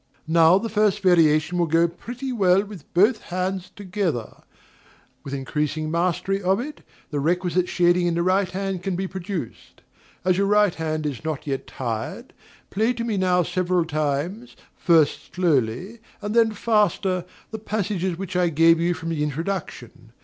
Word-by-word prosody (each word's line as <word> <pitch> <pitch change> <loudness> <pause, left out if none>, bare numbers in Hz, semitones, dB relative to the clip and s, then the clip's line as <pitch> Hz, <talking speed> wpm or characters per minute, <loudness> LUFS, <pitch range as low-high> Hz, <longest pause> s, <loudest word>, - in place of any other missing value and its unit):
Now 165 +2 +5
the 230 - -2
first 210 -1 +1
variation 165 -1 +3
will 170 - +2
go 165 +2 +3
pretty 245 +10 -7
well 195 -4 +3
with 195 -7 -12
both 215 +5 +4
hands 185 +1 -3
together; 185 - -3 0.9
with 135 - -7
increasing 150 +3 -2
mastery 180 +3 0
of 190 +2 +2
it, 295 +5 -6 0.3
the 145 - -1
requisite 180 +3 0
shading 175 0 +3
in 170 - 0
the 170 - +1
right 185 +1 +2
hand 195 -1 -3
can 190 0 -2
be 190 +2 -2
produced. 185 - -7 0.4
As 185 0 +2
your 200 - +2
right 210 -2 +4
hand 155 -1 -3
is 145 -3 -4
not 155 -3 -4
yet 135 -2 -3
tired, 115 -4 -5 0.4
play 220 +5 +1
to 235 -1 -4
me 230 -3 -1
now 180 -2 +2
several 180 0 0
times, 155 - -2 0.2
first 155 -4 +2
slowly 170 - 0 0.2
and 210 0 -4
then 225 -1 +4
faster, 205 -5 +1 0.3
the 220 - -5
passages 200 -4 -2
which 185 -1 -6
I 180 -1 +3
gave 165 +1 +4
you 175 +1 +1
from 165 +1 -6
the 160 -3 -2
introduction. 165 +6 -4
180 Hz, 165 wpm, -23 LUFS, 160-195 Hz, 0.9 s, Now